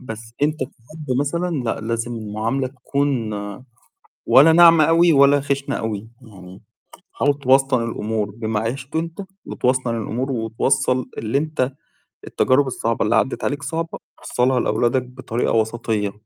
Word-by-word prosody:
بس 115 -2 -9
أنت 155 +1 +1
كأب 130 +4 -8 0.2
مثلًا 165 0 -1
لأ، 115 - -2
لازم 115 +2 -3
المعاملة 110 +5 -2
تكون 130 -3 -2 0.9
ولا 150 +5 +7
ناعمة 165 -1 +7
أوي 165 +1 +4
ولا 140 0 +5
خِشنة 140 0 -2
أوي، 110 -1 -4
يعني 95 -5 -13 0.5
حاول 145 0 +1
توسطن 135 -2 +3
الأمور 110 -2 -3
بما 110 0 -3
عِشته 135 +7 -3
أنت 165 +3 -5 0.2
وتوسطن 125 -2 0
الأمور 120 +5 -3
وتوصّل 125 +2 0
اللي 110 +4 -1
أنت 145 -3 -1 0.6
التجارب 135 +2 +2
الصعبة 115 -3 -1
اللي 105 - +2
عدِّت 135 - 0
عليك 145 +1 -2
صعبة 165 +2 -4 0.2
وصّلها 125 +1 +1
لأولادك 120 +4 +1
بطريقة 125 -1 -3
وسطيّة. 110 -2 -1
130 Hz, 135 wpm, -21 LUFS, 115-140 Hz, 0.9 s, ولا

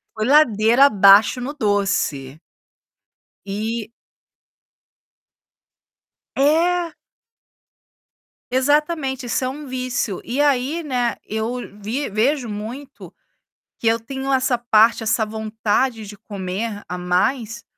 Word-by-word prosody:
foi 215 - -2
ladeira 240 -3 +5
abaixo 205 0 +5
no 270 +4 -5
doce. 195 - -1 1.1
E 220 +3 -4 2.4
É. 335 +4 +2 1.6
Exatamente, 270 0 0
isso 240 - -1
é 255 - 0
um 290 +3 -7
vício. 255 -6 -3
E 255 +5 -3
aí, 285 +3 +1
né, 250 -5 -1
eu 220 +3 -3 0.3
vi 245 +8 -3
vejo 245 +4 0
muito 240 +7 -8 0.7
que - - -6
eu 230 0 +2
tenho 265 +3 -5
essa 260 -2 +1
parte, 230 -1 +3
essa 220 0 +1
vontade 220 +1 -2
de 210 - -10
comer 205 +2 -5
a 180 0 -5
mais, 225 +6 -1
235 Hz, 100 wpm, -20 LUFS, 215-270 Hz, 2.4 s, ladeira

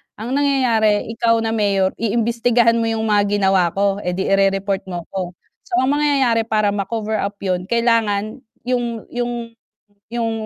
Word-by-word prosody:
ang 225 +4 -6
nangyayari 250 -7 +2
ikaw 230 0 +2
na 225 - -1
mayor 200 -3 +1
iimbestigahan 230 +1 +2
mo 230 - 0
'yung 225 0 -1
mga 205 -1 +2
ginawa 190 -2 +3
ko, 200 0 +1
eh 180 -3 -3
'di 190 +1 -1
i-re-report 195 0 +1
mo 175 -2 -5
ko, 185 -2 -4 0.3
so 365 - -2
ang 260 - +2
mangyayari 270 -6 +2
para 215 -2 +1
ma-cover 215 +2 -2
up 200 +1 -3
'yun 185 -1 -1
kailangan 225 -1 +1 0.2
'yung 240 -2 -2
'yung 240 0 -2 0.8
'yung 230 -1 -1
220 Hz, 155 wpm, -19 LUFS, 200-235 Hz, 0.8 s, ginawa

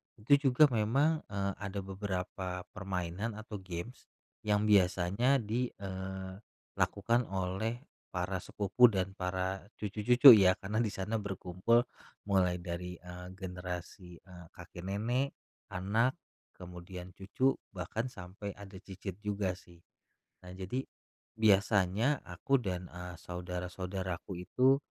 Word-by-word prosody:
Itu 115 +5 +2
juga 140 +1 +5
memang, 135 +9 +2
eee, 100 -1 -1
ada 100 -1 -4
beberapa 95 -2 -4
permainan 95 +2 -3
atau 110 -1 -7
games 95 +6 -7 0.4
yang 105 0 +3
biasanya 100 +5 +4
di 120 +4 0
eee, 95 0 -6 0.4
lakukan 115 +4 +2
oleh 95 +7 -2 0.2
para 90 +1 -2
sepupu 105 +7 +4
dan 95 -3 -1
para 95 +2 -2
cucu-cucu, 115 +6 +7
ya. 95 -4 +7
Karena 105 +3 -1
di 110 -3 +1
sana 105 +4 -1
berkumpul 100 +4 +1 0.4
mulai 95 -3 +2
dari, 90 0 -5
eee, 90 0 -8
generasi, 90 -1 -6
eee, 90 -1 -13
kakek-nenek, 100 +10 -2 0.4
anak, 110 +7 +2 0.4
kemudian 90 0 -9
cucu, 115 +8 +1 0.2
bahkan 95 +6 -3
sampe 100 -2 -7
ada 100 -1 -11
cicit 95 -1 -8
juga, 100 -3 -1
sih. 85 -2 -18 0.6
Nah, 90 - -9
jadi 95 +8 -3 0.5
biasanya 105 +4 +3
aku 135 -2 0
dan, 90 -3 -3
eee, 90 -1 -7
saudara-saudaraku 90 +1 -5
itu 130 +2 +4
95 Hz, 115 wpm, -32 LUFS, 90-110 Hz, 0.6 s, cucu-cucu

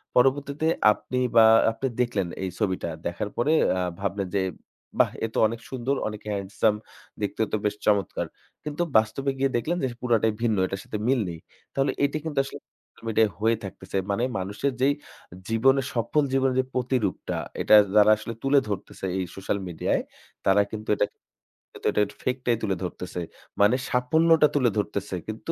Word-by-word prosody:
পরবর্তীতে 140 +4 +2 0.3
আপনি 125 +4 -4 0.2
বা 115 -1 +8 0.3
আপনি 135 +4 -3
দেখলেন 110 -7 0 0.2
এই 95 - -1
ছবিটা। 95 -5 -1 0.2
দেখার 85 +4 -2
পরে 145 +7 +2 0.2
আ - - 0 0.2
ভাবলেন 100 0 -2
যে - - +2 0.6
বাহ! - - +5
এ - - -1
তো - - 0
অনেক 115 +1 -5
সুন্দর, 130 +2 -1
অনেক 105 0 -6
handsome, 100 +2 0 0.4
দেখতে 105 - -2
তো 110 - +1
বেশ 105 - +1
চমৎকার। 100 -2 +1 0.4
কিন্তু 150 +3 -2
বাস্তবে 135 +6 +1
গিয়ে 135 0 +2
দেখলেন 170 +8 -1
যে - - +2
পুরোটাই 115 -3 +2
ভিন্ন, 110 -4 +2
এটার 95 +1 -5
সাথে 105 - -5
মিল 130 -1 +3
নেই। 85 -1 -7 0.3
তাহলে 135 0 +1
এটি 140 +2 +1
কিন্তু 150 -3 -1
আসলে 135 - -8 0.2
social - - -25
media 110 0 +4
হয়ে 115 +1 +2
থাকতেছে। 100 0 -6
মানে 115 +5 0 0.2
মানুষের 100 +9 -2
যেই 140 +2 +4 0.6
জীবনের 135 +4 +3
সফল 120 +6 +1
জীবনের 130 -1 +2
যে - - -9
প্রতিরূপটা 125 -2 -1 0.2
এটা - - +6 0.2
যারা 105 0 +7
আসলে 110 +2 -6
তুলে 140 +1 +5
ধরতেছে 95 -1 -5
এই - - 0
social 95 +1 -2
media-ই 85 -2 0 0.4
তারা 95 +1 +5
কিন্তু 110 0 -6
এটা - - +3 0.7
কিন্তু - - -4
এটার 105 -1 +2
fake 130 0 -1
টাই 120 -1 +3
তুলে 100 -3 +1
ধরতেছে। 90 0 -5 0.4
মানে 105 +4 +5
সাফল্যটা 160 +5 +4
তুলে 130 -4 +4
ধরতেছে 100 -2 -2
কিন্তু 110 +9 -4
115 Hz, 170 wpm, -26 LUFS, 100-135 Hz, 0.7 s, বা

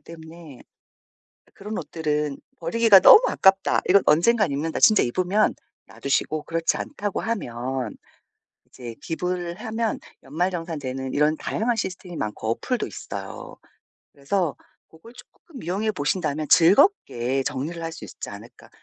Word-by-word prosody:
때문에 160 -2 -12 1.0
'그런 210 +2 -7
옷들은 150 -3 -2 0.2
버리기가 230 -5 +5
너무 440 - +9
아깝다. 195 0 +3
이건 195 +1 +6
언젠가는 185 +3 +3
입는다.' 155 +3 -2
진짜 215 -2 +6
입으면 185 - +1 0.3
놔 - - -17
두시고 150 +2 0
그렇지 165 0 -1
않다고 205 -8 -4
하면 130 - -4 0.7
이제 120 -3 -10
기부를 175 +1 -3
하면 225 -1 -2 0.2
연말정산되는 150 -4 -3
이런 150 +2 +2
다양한 235 +2 -1
시스템이 185 -4 -5
많고 110 -1 -4
어플도 240 - -2
있어요. 100 -1 -8 0.6
그래서 160 +3 -2 0.3
고걸 165 +9 -17
쪼끔 265 +2 -15
이용해 205 +5 -1
보신다면 155 -3 -2
즐겁게 165 - +3
정리를 150 +5 -4
할 165 - -4
수 - - -9
있지 - - -9
않을까. - - -13
165 Hz, 320 characters per minute, -24 LUFS, 140-200 Hz, 1.0 s, 너무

